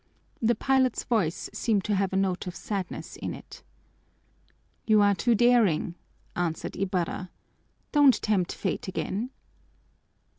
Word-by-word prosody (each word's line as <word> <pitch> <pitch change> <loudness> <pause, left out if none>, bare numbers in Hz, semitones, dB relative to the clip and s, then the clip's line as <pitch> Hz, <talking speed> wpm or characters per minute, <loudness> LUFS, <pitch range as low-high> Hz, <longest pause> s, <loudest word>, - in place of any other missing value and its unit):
The 235 +1 +3
pilot's 260 +1 +2
voice 200 -10 0
seemed 210 -5 +1
to 210 - -1
have 195 -1 +1
a - - -2
note 190 -2 0
of 180 - -5
sadness 195 -4 -5
in - - -4
it. - - -12 1.3
"You 215 -1 +5
are 205 0 +5
too 235 +4 +2
daring," 220 -8 +3 0.4
answered 170 -2 -2
Ibarra. 185 -1 -2 0.6
"Don't 285 -4 +6
tempt 195 -5 +1
fate - - -3
again." 200 +5 -3
200 Hz, 125 wpm, -27 LUFS, 185-235 Hz, 1.3 s, Don't